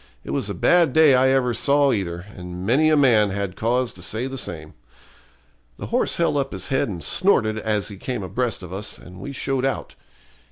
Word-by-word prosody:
It -, -, -7 dB
was -, -, -2 dB
a -, -, -4 dB
bad 170 Hz, -6 st, +3 dB
day 160 Hz, -3 st, +6 dB
I 130 Hz, +1 st, +4 dB
ever 130 Hz, -2 st, +2 dB
saw 140 Hz, +3 st, +3 dB
either, 90 Hz, -5 st, -3 dB
and 90 Hz, 0 st, -7 dB
many 140 Hz, +9 st, +3 dB
a 155 Hz, -, +4 dB
man 115 Hz, -7 st, +4 dB
had 100 Hz, -1 st, -3 dB
cause 125 Hz, +2 st, 0 dB
to 90 Hz, -, -12 dB
say 110 Hz, +7 st, -2 dB
the 135 Hz, 0 st, -5 dB
same. 80 Hz, -11 st, -6 dB, 1.0 s
The -, -, -6 dB
horse -, -, +1 dB
held 170 Hz, -3 st, +1 dB
up 135 Hz, -1 st, -2 dB
his -, -, -5 dB
head 135 Hz, -4 st, 0 dB
and 85 Hz, -6 st, -6 dB
snorted 110 Hz, -, +2 dB
as 105 Hz, -2 st, -1 dB
he 100 Hz, -, -9 dB
came 120 Hz, +1 st, -4 dB
abreast 115 Hz, +1 st, -2 dB
of 90 Hz, 0 st, -8 dB
us, 100 Hz, +2 st, -5 dB
and 90 Hz, 0 st, -13 dB
we 140 Hz, -, -6 dB
showed 135 Hz, -1 st, -2 dB
out. 135 Hz, -1 st, -2 dB
120 Hz, 210 wpm, -22 LUFS, 95-135 Hz, 1.0 s, day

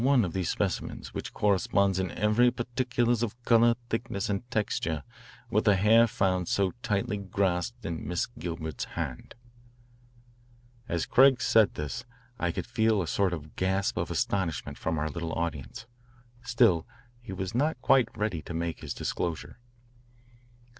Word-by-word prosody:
There -, -, 0 dB
is -, -, +4 dB
just 130 Hz, -, +5 dB
one -, -, +1 dB
of 85 Hz, -, -5 dB
these 95 Hz, -2 st, -1 dB
specimens -, -, -3 dB
which -, -, -5 dB
corresponds 100 Hz, -1 st, +2 dB
in 95 Hz, -1 st, -1 dB
every 105 Hz, +7 st, +3 dB
particular 120 Hz, 0 st, -1 dB
of 120 Hz, 0 st, -3 dB
colour, 115 Hz, 0 st, +5 dB, 0.2 s
thickness, 115 Hz, -3 st, -2 dB
and 100 Hz, +5 st, -3 dB
texture 80 Hz, -, -1 dB, 0.5 s
with -, -, +2 dB
the 105 Hz, -, +5 dB
hair 110 Hz, +4 st, +5 dB
found 95 Hz, -4 st, 0 dB
so 95 Hz, -2 st, +1 dB
tightly 105 Hz, 0 st, -1 dB
grasped 100 Hz, +3 st, -1 dB
in 85 Hz, -1 st, -4 dB
Miss 90 Hz, -1 st, 0 dB
Gilbert's 80 Hz, +2 st, -5 dB
hand." -, -, -5 dB, 1.5 s
As 85 Hz, -1 st, 0 dB
Craig 130 Hz, -1 st, +5 dB
said 110 Hz, -4 st, +4 dB
this 75 Hz, -5 st, -4 dB, 0.4 s
I 90 Hz, -4 st, +1 dB
could -, -, -4 dB
feel 110 Hz, -3 st, +2 dB
a -, -, -6 dB
sort 100 Hz, +2 st, +1 dB
of 75 Hz, -3 st, -7 dB
gasp 95 Hz, +1 st, 0 dB
of -, -, -2 dB
astonishment 90 Hz, -7 st, -2 dB
from 80 Hz, 0 st, -1 dB
our 75 Hz, +1 st, 0 dB
little 80 Hz, +2 st, -4 dB
audience. 85 Hz, -, -4 dB, 0.6 s
Still 115 Hz, -9 st, +3 dB, 0.3 s
he 115 Hz, -, -9 dB
was 95 Hz, +1 st, -4 dB
not 145 Hz, +3 st, +1 dB
quite 130 Hz, -4 st, +5 dB
ready 105 Hz, -6 st, -1 dB
to 80 Hz, -, -7 dB
make 85 Hz, 0 st, -2 dB
his 70 Hz, -4 st, -6 dB
disclosure. 85 Hz, +4 st, -3 dB
100 Hz, 160 wpm, -28 LUFS, 85-115 Hz, 1.5 s, just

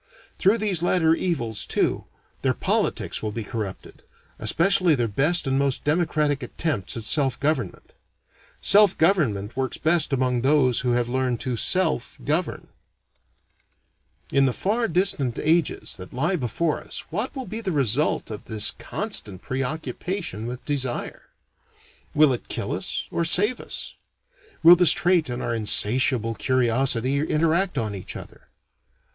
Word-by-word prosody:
Through 200 Hz, +4 st, +3 dB
these 205 Hz, -6 st, 0 dB
latter 170 Hz, -2 st, +2 dB
evils, 135 Hz, -, -2 dB
too, -, -, 0 dB, 0.4 s
their -, -, 0 dB
politics -, -, -1 dB
will 110 Hz, -, -3 dB
be 115 Hz, +1 st, -5 dB
corrupted; 105 Hz, -2 st, -7 dB, 0.4 s
especially 175 Hz, -1 st, +3 dB
their 120 Hz, -3 st, -1 dB
best 150 Hz, -, +1 dB
and 135 Hz, 0 st, 0 dB
most 140 Hz, -2 st, 0 dB
democratic 150 Hz, -2 st, 0 dB
attempts 125 Hz, -, -4 dB
at 115 Hz, -, -5 dB
self 135 Hz, +2 st, +2 dB
government. 155 Hz, +3 st, -3 dB, 0.7 s
Self 205 Hz, -2 st, +5 dB
government 125 Hz, -, +1 dB
works 130 Hz, -1 st, -3 dB
best 160 Hz, -1 st, +2 dB
among 125 Hz, -2 st, 0 dB
those 130 Hz, -2 st, +3 dB
who 125 Hz, -1 st, 0 dB
have 120 Hz, -1 st, 0 dB
learned 125 Hz, -1 st, -1 dB
to 125 Hz, -2 st, -2 dB
self 160 Hz, -, 0 dB
govern. 155 Hz, +4 st, -2 dB, 1.6 s
In 135 Hz, 0 st, +3 dB
the 125 Hz, -, 0 dB
far 225 Hz, -, -1 dB
distant 165 Hz, -, 0 dB
ages 160 Hz, 0 st, 0 dB
that 90 Hz, 0 st, -11 dB
lie 160 Hz, +9 st, 0 dB
before 150 Hz, +3 st, -2 dB
us -, -, -6 dB
what 210 Hz, -, -2 dB
will 260 Hz, -2 st, -5 dB
be 220 Hz, 0 st, -6 dB
the 195 Hz, -4 st, -3 dB
result 140 Hz, -3 st, 0 dB
of 105 Hz, -, -8 dB
this 110 Hz, -2 st, +4 dB
constant 95 Hz, -3 st, -2 dB
preoccupation 135 Hz, -, -4 dB
with 125 Hz, +1 st, -7 dB
desire? 135 Hz, -4 st, -4 dB, 0.9 s
Will 150 Hz, -3 st, +5 dB
it 120 Hz, -, -6 dB
kill -, -, -4 dB
us -, -, -3 dB
or 170 Hz, -, -1 dB
save 205 Hz, +8 st, +4 dB
us? -, -, -6 dB, 0.7 s
Will 170 Hz, +2 st, +9 dB
this 175 Hz, -3 st, +6 dB
trait 175 Hz, -4 st, +1 dB
and 120 Hz, 0 st, -4 dB
our -, -, -2 dB
insatiable 115 Hz, +2 st, +2 dB
curiosity 130 Hz, +2 st, +1 dB
interact 165 Hz, +3 st, 0 dB
on 110 Hz, -4 st, -2 dB
each 95 Hz, -2 st, -7 dB
other? -, -, -12 dB
140 Hz, 145 wpm, -23 LUFS, 120-170 Hz, 1.6 s, Will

